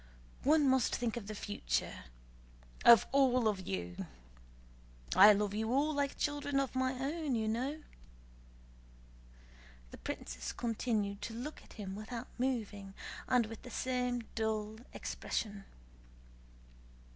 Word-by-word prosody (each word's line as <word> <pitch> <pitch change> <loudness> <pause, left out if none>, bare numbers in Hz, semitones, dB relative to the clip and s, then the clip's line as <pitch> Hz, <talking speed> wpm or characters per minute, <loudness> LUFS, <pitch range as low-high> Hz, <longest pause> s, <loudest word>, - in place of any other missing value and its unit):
One 300 0 +4
must 260 -3 +3
think 240 -2 -1
of 225 -4 -5
the 215 - -5
future, 130 - -2 0.8
of 235 -2 +9
all 255 -4 +4
of 195 -4 -1
you... 90 -2 -4 1.1
I 205 +3 +10
love 205 0 +1
you 220 +2 -1
all, 290 +4 +2
like 285 -1 -1
children 285 -1 0
of 275 -1 -1
my 260 0 +1
own, 280 +2 -1
as - - +1
you 220 -1 0
know." 265 +8 -2 2.1
The - - -10
princess - - -5
continued 215 -3 -1
to 225 +1 -5
look 275 +6 -6
at - - -16
him 195 -2 -6
without 230 +3 -6
moving, 210 -6 -2 0.3
and 250 -2 +4
with 225 0 -8
the - - -10
same 250 -1 -1
dull 220 -1 -1
expression. 205 -3 -4
230 Hz, 130 wpm, -34 LUFS, 210-260 Hz, 2.1 s, I